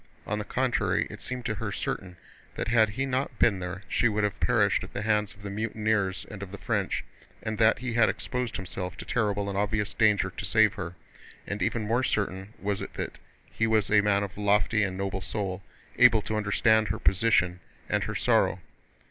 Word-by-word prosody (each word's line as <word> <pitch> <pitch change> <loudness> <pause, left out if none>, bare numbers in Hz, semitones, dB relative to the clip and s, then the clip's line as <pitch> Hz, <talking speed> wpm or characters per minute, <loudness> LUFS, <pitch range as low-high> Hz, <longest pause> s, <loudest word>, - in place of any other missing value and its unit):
On 105 0 -2
the 105 - -4
contrary, 130 +1 +1
it - - -9
seemed 125 -1 -5
to 110 - 0
her 105 0 -4
certain 90 -1 -4 0.4
that - - -3
had 110 -2 +4
he 130 +6 -2
not 130 +1 -2
been 100 -5 +3
there 90 +2 -5
she 120 - +2
would 105 0 0
have 105 -2 -1
perished - - +2
at - - -10
the 100 - -3
hands 105 -2 +1
of 100 - -17
the 100 - -5
mutineers 105 -2 -1
and 105 -3 -8
of 100 -2 -7
the 100 - -7
French, - - -1 0.4
and 110 -1 -3
that 110 0 +5
he 125 -1 -4
had 115 -1 +4
exposed 125 -3 -3
himself 90 -4 -5
to - - -7
terrible 105 -3 0
and 100 - -3
obvious 105 0 0
danger 105 -4 +3
to - - -7
save 110 -1 +4
her, 90 -4 -6 0.5
and 100 +1 -4
even 115 - 0
more 115 +4 +1
certain 100 -3 -2
was 100 -1 -2
it - - -7
that - - -5 0.3
he 110 - 0
was 110 -2 +2
a 105 0 +6
man 100 -1 +2
of 100 0 -6
lofty 105 +1 +3
and 95 -2 -1
noble 95 0 -2
soul, 95 -2 -3 0.4
able 120 -4 +7
to 110 - -3
understand 110 +1 +3
her 95 - -2
position 90 -3 +2 0.3
and - - 0
her - - -4
sorrow. - - +2
105 Hz, 205 wpm, -28 LUFS, 100-110 Hz, 0.5 s, able